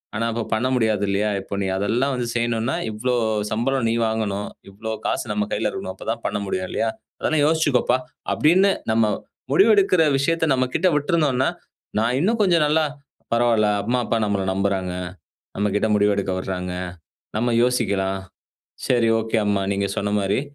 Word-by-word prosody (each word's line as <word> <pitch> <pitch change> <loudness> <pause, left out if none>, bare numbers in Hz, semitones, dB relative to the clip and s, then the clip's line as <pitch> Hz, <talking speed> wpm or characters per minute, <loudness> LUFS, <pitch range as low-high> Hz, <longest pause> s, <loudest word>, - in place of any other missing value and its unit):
ஆனா, 115 +2 0
இப்ப 115 -1 -2
பண்ண 110 +3 +1
முடியாது. 110 -4 +1
இல்லையா? 100 +2 +1
இப்ப, 95 - -9
நீ 95 - -1
அதெல்லாம் 120 +8 0
வந்து 120 -1 -2
செய்யணும்னா, 120 +1 0 0.2
இவ்வளவு 110 -2 0
சம்பளம் 120 +2 0
நீ 115 - +1
வாங்கணும்? 105 -2 -2 0.2
இவ்வளவு 110 +3 -5
காசு - - -1
நம்ம 105 0 -1
கையில - - 0
இருக்கணும். 95 - -5
அப்ப - - -11
தான் 115 0 -5
பண்ண 105 - -2
முடியும் 95 -1 -2
இல்லையா? 115 - 0 0.3
அதெல்லாம் 155 -2 +1
யோசிச்சுக்கப்பா." 145 -6 +2 0.4
அப்படீன்னுட்டு, 185 +6 +4 0.2
நம்ம 115 0 +3 0.5
முடிவெடுக்கிற 195 0 +5
விஷயத்த 165 +4 +1
நம்மகிட்ட 130 +7 +1
விட்டுருந்தோன்னா, 145 -4 +1 0.5
நான் 115 +3 +1
இன்னும் 225 +8 +1
கொஞ்சம் 175 -5 +4
நல்லா, 155 +2 +3 0.5
"பரவால்ல 115 -2 +3 0.2
அம்மா, 125 +1 0
அப்பா 115 - 0
நம்மள 100 -2 0
நம்புறாங்க. 95 -2 -1 0.6
நம்மகிட்ட 105 +1 +1
முடிவு 105 0 +3
எடுக்க 100 -1 -1
விடுறாங்க. 90 -1 -4 0.6
நம்ம 120 +1 +1
யோசிக்கலாம். 95 -6 0 0.7
சரி, 120 -2 +3
ஒகே 110 0 -1
அம்மா. 100 -1 +1
நீங்க 100 0 0
சொன்ன 105 0 -1
மாதிரி, 100 +3 +1
115 Hz, 155 wpm, -22 LUFS, 100-135 Hz, 0.7 s, முடிவெடுக்கிற